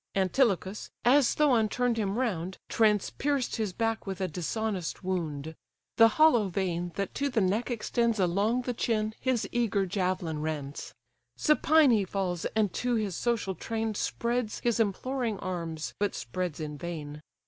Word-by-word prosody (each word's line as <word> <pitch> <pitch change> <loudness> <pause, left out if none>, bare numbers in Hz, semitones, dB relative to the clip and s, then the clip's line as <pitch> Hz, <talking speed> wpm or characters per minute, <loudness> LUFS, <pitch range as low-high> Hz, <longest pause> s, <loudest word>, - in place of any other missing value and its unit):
Antilochus, 195 0 +1 0.2
as 265 +1 +5
Thoon 245 -8 +3
turn'd 245 +1 +1
him 205 -1 -1
round, 190 -8 -2
Transpierced 235 +5 +1
his 215 -4 -1
back 225 +2 -2
with 190 -2 -4
a 190 - 0
dishonest 185 +3 -3
wound: 160 -5 -3 0.4
The 225 - +9
hollow 245 -10 +5
vein, 175 -2 -2
that 200 -1 -3
to 280 0 -1
the 250 -4 +1
neck 205 +6 +1
extends 235 -1 0
Along 200 +7 +1
the 245 - -2
chine, 220 -2 0
his 240 -5 0
eager 220 -5 +1
javelin 180 -4 -1
rends: 150 -2 -5 0.4
Supine 300 - +4
he 215 -3 +3
falls, 185 -3 -2
and 215 -3 +2
to 245 -1 0
his 210 -5 -1
social 230 -4 0
train 225 +2 -3
Spreads 235 +1 -1
his 235 -1 +1
imploring 230 +2 -1
arms, 170 -4 -4
but 205 0 0
spreads 170 +6 -4
in 150 -2 -5
vain. 150 -4 -6
205 Hz, 150 wpm, -29 LUFS, 180-235 Hz, 0.4 s, The